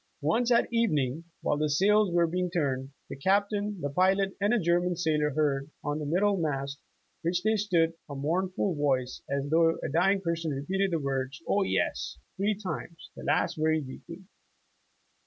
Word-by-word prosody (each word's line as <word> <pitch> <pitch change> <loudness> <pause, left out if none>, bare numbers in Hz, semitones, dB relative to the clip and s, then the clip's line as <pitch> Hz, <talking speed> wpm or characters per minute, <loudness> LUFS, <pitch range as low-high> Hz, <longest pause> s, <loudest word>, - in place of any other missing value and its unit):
"Once 230 +12 +1
at 235 - +4
evening, 160 - +1 0.2
while 150 - +1
the 150 0 +1
sails 205 +7 +4
w^re 170 -1 +2
being 180 0 0
turned, 135 -6 -1 0.2
the - - -7
Captain, 200 +5 0
the 145 - -1
pilot, 190 +4 +2
and 205 +1 +3
a 240 - +3
German 175 0 +1
sailor 155 -3 +1
heard, 145 -2 0
on 145 +1 -2
the 150 - -4
middle 195 +6 +2
mast 140 -4 -2 0.4
under 170 - 0
which 175 +1 -1
they 220 +1 +3
stood, 175 -6 +2 0.2
a 140 - -6
mournful 180 +6 0
voice, 135 -4 0
as 140 0 -1
though 165 0 +4
a - - -2
dying 185 +6 +3
person 170 -3 -2
repeated 185 +8 -1
the 170 - 0
words, 135 -2 -2
'0, 205 - +2
yes,' - - -1 0.2
three 205 +2 +1
times, 170 - -7
the - - -9
last - - +1
very 160 0 +2
weakly." 165 +6 -9
165 Hz, 175 wpm, -28 LUFS, 145-195 Hz, 0.4 s, at